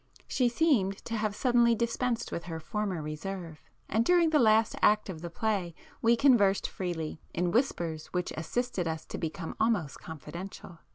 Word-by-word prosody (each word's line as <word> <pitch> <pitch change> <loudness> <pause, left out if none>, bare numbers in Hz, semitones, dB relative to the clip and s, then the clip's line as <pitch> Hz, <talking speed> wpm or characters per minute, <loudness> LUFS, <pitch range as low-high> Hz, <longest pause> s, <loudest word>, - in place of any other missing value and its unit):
She 250 -2 +2
seemed 235 - +2
to 230 - -3
have 215 -2 -1
suddenly 240 -1 +4
dispensed 235 +1 -1
with 170 - -4
her 165 -2 -5
former 190 -1 -3
reserve, 160 +1 -6 0.3
and 220 +3 +2
during 345 +1 +4
the 305 - +4
last 220 -2 +4
act 210 -1 +4
of 165 -4 -6
the 170 - -5
play, 185 -2 -1 0.3
we 230 +1 +5
conversed 225 -6 +4
freely, 165 -4 -4
in 175 +1 +1
whispers 170 - 0
which 180 0 -3
assisted 180 +3 -2
us 160 -1 -3
to - - -6
become 165 +1 -4
almost 205 -11 +1
confidential. 170 +2 -9
195 Hz, 165 wpm, -30 LUFS, 170-235 Hz, 0.3 s, we